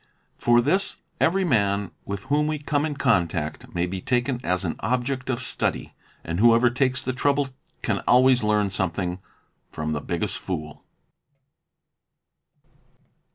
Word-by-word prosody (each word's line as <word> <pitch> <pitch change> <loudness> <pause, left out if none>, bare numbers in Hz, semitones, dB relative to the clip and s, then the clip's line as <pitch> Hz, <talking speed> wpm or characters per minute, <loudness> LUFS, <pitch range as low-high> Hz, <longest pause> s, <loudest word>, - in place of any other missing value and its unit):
For 120 0 +4
this 190 +10 +1 0.2
every 190 +4 +3
man 100 - +1
with 100 0 -5
whom 150 +1 +1
we 155 0 -1
come 145 0 0
in 150 - -4
contact 90 - 0
may 85 0 +1
be 90 +1 -5
taken 125 +2 0
as 90 +1 0
an 85 - -2
object 130 +1 -1
of 130 0 -1
study, - - -2 0.3
and 85 +2 -3
whoever 120 +2 +5
takes 130 0 0
the 130 - -2
trouble 140 +1 +1 0.3
can - - 0
always 130 0 +5
we 105 - 0
learn 105 -2 +2
something 95 -1 -2 0.5
from 75 0 -3
the 75 - -2
biggest - - -2
fool. 75 -5 -5
120 Hz, 145 wpm, -24 LUFS, 95-130 Hz, 0.5 s, whoever